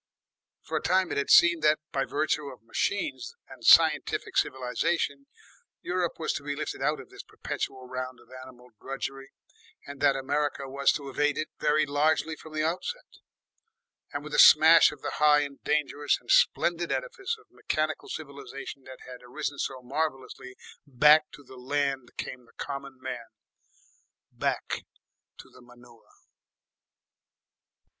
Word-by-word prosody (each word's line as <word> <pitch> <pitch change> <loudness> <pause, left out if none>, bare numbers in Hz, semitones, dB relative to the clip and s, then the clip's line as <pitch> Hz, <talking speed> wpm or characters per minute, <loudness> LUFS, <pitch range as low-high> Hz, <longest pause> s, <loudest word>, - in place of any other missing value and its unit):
For - - -3
a - - -2
time 185 0 +1
it - - 0
had 140 - -2
seemed 170 -1 +6
that, 155 0 +4
by 135 -1 0
virtue 150 0 -1
of 125 -4 -15
machines, 130 - -2
and - - -14
scientific - - +4
civilisation, 140 +2 -1 0.6
Europe 180 -1 -1
was 160 - -2
to 140 - -5
be 145 0 -3
lifted 155 +1 -5
out 150 0 0
of 130 - -12
this - - -10
perpetual 130 -1 -6
round 130 0 -5
of - - -21
animal 125 -1 -15
drudgery, 135 0 -6 0.6
and 140 0 -10
that 140 -2 +4
America 140 +1 -2
was 140 +1 +2
to 140 -2 -5
evade 145 +2 0
it 155 - -3
very 155 +1 +2
largely 155 +2 +1
from 155 0 -13
the 155 0 0
outset. 485 - -4 0.9
And - - -5
with - - -9
the - - +2
smash - - +8
of - - -13
the - - -4
high 150 -1 +6
and 140 -1 -6
dangerous 145 -1 0
and - - -5
splendid 175 - +3
edifice 460 -2 -3
of 435 - -24
mechanical 155 0 -3
civilisation 140 -2 -8
that 130 -1 -12
had 125 -1 -11
arisen 145 +3 -5
so 130 -1 -4
marvellously, 130 -2 -4 0.3
back 150 +4 +5
to 145 - -13
the 130 0 -14
land 135 0 -2
came 125 -1 -6
the 115 - -24
common 140 -1 -6
man, 120 -2 -6 1.0
back - - -2 0.5
to - - -13
the - - -17
manure. 120 -1 -19
140 Hz, 150 wpm, -27 LUFS, 130-155 Hz, 1.0 s, smash